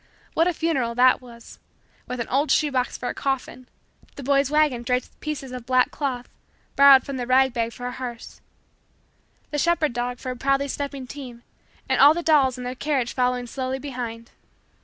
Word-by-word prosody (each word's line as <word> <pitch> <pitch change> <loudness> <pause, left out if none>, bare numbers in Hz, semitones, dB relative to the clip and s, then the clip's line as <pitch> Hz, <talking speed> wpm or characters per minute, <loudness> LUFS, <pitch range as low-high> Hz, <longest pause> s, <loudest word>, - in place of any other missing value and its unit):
What 330 - +3
a 360 - +1
funeral 265 -9 -1
that 255 +2 +4
was 235 -2 -14 0.5
with 250 0 -5
an 235 - -3
old 280 +3 +1
shoe 295 +1 +2
box 255 -1 -1
for 245 - -4
a - - -3
coffin, 255 -2 -3 0.5
the 280 - -8
boy's 275 0 +2
wagon 300 -5 +2
draped 250 +1 0
with - - -35
pieces 290 -4 -5
of 250 -2 -8
black 255 -1 +3
cloth 255 -4 -3 0.5
borrowed 275 -2 +7
from 275 -1 -5
the 245 -1 -4
rag 260 0 +4
bag 230 -2 -1
for 245 - -9
a 250 - -3
hearse, 245 -2 -8 1.1
the 295 - -1
shepherd 330 -4 +1
dog 245 +1 -3
for 255 +1 -5
a - - -5
proudly 275 +2 0
stepping 280 -1 -4
team, 250 -3 -10 0.4
and - - +2
all 290 +3 +8
the 345 - -3
dolls 275 -6 +3
in 250 - -7
their 250 +1 -4
carriage 260 -3 -1
following 250 -1 0
slowly 260 +1 -3
behind! 245 -4 -6
255 Hz, 195 wpm, -24 LUFS, 245-280 Hz, 1.1 s, all